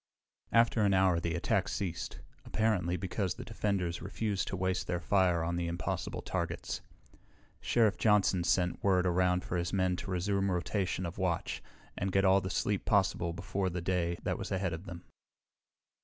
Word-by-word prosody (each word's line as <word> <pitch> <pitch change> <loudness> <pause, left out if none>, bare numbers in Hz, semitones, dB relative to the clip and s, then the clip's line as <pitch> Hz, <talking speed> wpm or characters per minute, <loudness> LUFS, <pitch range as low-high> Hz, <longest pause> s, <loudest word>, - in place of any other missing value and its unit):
After 115 -1 +4
an 100 -2 +4
hour 95 -2 +4
the 85 0 -2
attack 85 - +1
ceased, 85 -4 -4 0.2
apparently 95 -6 0
because 95 0 -2
the - - -8
defenders 100 -6 -1
refused 100 +2 -2
to - - -3
waste 95 0 -1
their 90 -1 -1
fire 90 -3 +2
on 85 +1 -1
the 85 -1 -1
impossible 85 0 -3
targets. - - -3 0.8
Sheriff 110 -6 +2
Johnson 100 -4 +3
sent 90 0 +1
word 95 -2 +3
around 90 0 +2
for 90 - -2
his 85 0 -1
men 95 -2 +1
to - - -6
resume 95 +2 0
rotation 90 0 -1
of 85 +3 -6
watch 90 -3 -1 0.3
and 95 0 -2
get 95 +1 +3
all 95 +1 +5
the 95 - -4
sleep 100 +2 0
possible 95 -4 +2
before 95 +1 -2
the 90 0 -3
day 85 -1 0
that - - -1
was - - -5
ahead 95 -3 0
of 80 +4 -6
them. 85 -1 -8
95 Hz, 170 wpm, -32 LUFS, 85-100 Hz, 0.8 s, all